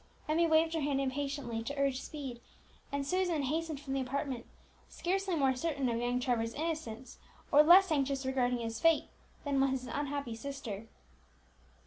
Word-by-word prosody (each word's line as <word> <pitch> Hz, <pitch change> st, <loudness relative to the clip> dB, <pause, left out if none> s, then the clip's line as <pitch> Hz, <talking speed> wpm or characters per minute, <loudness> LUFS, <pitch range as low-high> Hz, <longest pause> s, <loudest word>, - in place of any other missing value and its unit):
Emmie 330 Hz, +2 st, +3 dB
waved 320 Hz, +1 st, +3 dB
her 325 Hz, -, 0 dB
hand 280 Hz, -1 st, +1 dB
impatiently 275 Hz, -3 st, -2 dB
to 285 Hz, +5 st, -5 dB
urge 275 Hz, -2 st, +1 dB
speed, 265 Hz, -6 st, -7 dB, 0.5 s
and 280 Hz, 0 st, -1 dB
Susan 355 Hz, -2 st, +1 dB
hastened 310 Hz, +2 st, -2 dB
from 275 Hz, -2 st, -5 dB
the 270 Hz, -, 0 dB
apartment, 260 Hz, -1 st, -3 dB, 0.4 s
scarcely 380 Hz, 0 st, -1 dB
more 270 Hz, -4 st, +2 dB
certain 280 Hz, -1 st, -1 dB
of 230 Hz, 0 st, -1 dB
young 245 Hz, +1 st, 0 dB
Trevor's 235 Hz, -3 st, 0 dB
innocence, 295 Hz, -7 st, -4 dB, 0.3 s
or 295 Hz, -, +8 dB
less 360 Hz, +4 st, +7 dB
anxious 275 Hz, -2 st, 0 dB
regarding 250 Hz, -2 st, +1 dB
his 225 Hz, -1 st, -4 dB
fate, 330 Hz, -1 st, +3 dB, 0.4 s
than 280 Hz, -1 st, +2 dB
was 265 Hz, -1 st, +1 dB
his -, -, -9 dB
unhappy 280 Hz, -1 st, -3 dB
sister. 230 Hz, -4 st, -6 dB
275 Hz, 160 wpm, -32 LUFS, 255-310 Hz, 0.5 s, or